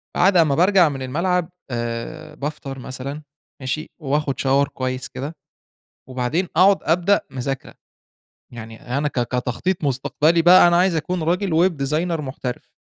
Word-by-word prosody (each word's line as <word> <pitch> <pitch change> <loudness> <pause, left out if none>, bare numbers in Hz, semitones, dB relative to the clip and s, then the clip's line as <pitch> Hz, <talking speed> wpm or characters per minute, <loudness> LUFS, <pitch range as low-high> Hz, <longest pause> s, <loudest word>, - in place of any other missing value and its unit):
بعد 185 +1 +4
امّا 155 -4 +4
بارجع 180 0 +5
من 135 -2 -6
الملعب 170 +6 0 0.2
آآ 120 +7 -5
بافطر 145 -2 -6
مثلًا، 130 +3 -6 0.4
ماشي، 135 +4 -3
وآخد 145 -1 -1
Shower 140 +1 +2
كويّس 130 0 -3
كده، 145 +5 -6 0.7
وبعدين 130 +8 -1
أقعد 195 +1 +6
أبدأ 180 +5 +2
مذاكرة. 135 0 -5 0.8
يعني 115 -1 -9 0.2
أنا 150 +1 0
ك 135 - -2
كتخطيط 125 +9 -2
مستقبلي 150 +5 +2
بقى 175 +1 +8
أنا 170 - +3
عايز 180 0 +3
أكون 175 +2 -2
راجل 175 +1 +2
web - - -8
designer 165 +3 -1
محترف. 130 -3 -6
150 Hz, 140 wpm, -21 LUFS, 130-175 Hz, 0.8 s, بقى